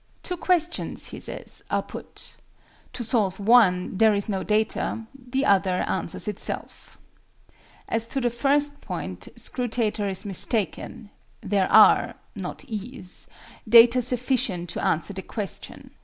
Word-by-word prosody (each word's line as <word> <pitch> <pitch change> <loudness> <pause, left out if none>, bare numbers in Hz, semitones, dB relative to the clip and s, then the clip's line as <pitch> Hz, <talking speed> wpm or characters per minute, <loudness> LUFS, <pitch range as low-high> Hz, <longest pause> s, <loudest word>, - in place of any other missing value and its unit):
"Two 360 - -2
questions," 350 -1 -1
he - - -8
says, - - -6
"are - - 0
put. - - -11 0.6
To 245 - -4
solve 210 -5 0
one 200 -4 +3
there 220 -2 +5
is 200 - -2
no 195 -3 -2
data: 220 +1 -1
the 265 +1 -3
other 190 -2 +2
answers 165 - -1
itself." 210 0 -3 0.9
As 230 0 -2
to 270 - -2
the 240 -2 0
first 285 +4 +1
point, - - -6
SCRUTATOR 225 -4 -2
is 190 +1 +2
mistaken; 205 +2 +1 0.3
there 195 -2 0
are - - +6 0.2
(not - - -7
"is") 215 -4 -5 0.4
data 235 +2 +7
sufficient 245 -8 0
to - - -4
answer 170 +5 0
the 190 - -6
question. 205 0 -6
220 Hz, 130 wpm, -24 LUFS, 195-245 Hz, 0.9 s, data